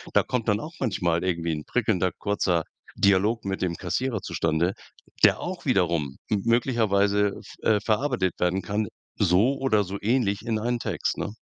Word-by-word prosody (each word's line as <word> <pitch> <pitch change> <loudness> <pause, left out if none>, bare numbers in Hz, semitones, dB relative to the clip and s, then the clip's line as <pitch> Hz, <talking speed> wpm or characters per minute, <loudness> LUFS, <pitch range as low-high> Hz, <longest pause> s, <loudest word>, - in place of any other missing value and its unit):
da - - +5
kommt 120 -3 -2
dann 105 -1 +2
auch 155 +7 -7
manchmal 90 -8 0
irgendwie 85 -2 -1
'n 75 -1 -4
prickelnder, 100 -6 +1
kurzer 90 -4 0 0.3
Dialog 100 +4 +2
mit 95 0 -3
dem 90 -2 0
Kassierer 110 +7 -2
zustande, 85 +3 0 0.5
der - - +6
auch 180 0 -5
wiederum 85 - +1
m 105 -2 +1
möglicherweise 105 -4 +2 0.3
v - - -24
äh, 105 -1 +4
verarbeitet 110 - 0
werden 90 +2 +1
kann, 105 +2 -2 0.3
so 105 +8 +3
oder 110 -6 +2
so 100 +1 -5
ähnlich 105 -2 +1
in 110 -2 0
einen 120 +2 -1
Text, - - -2
ne? - - -3
100 Hz, 170 wpm, -25 LUFS, 90-115 Hz, 0.5 s, der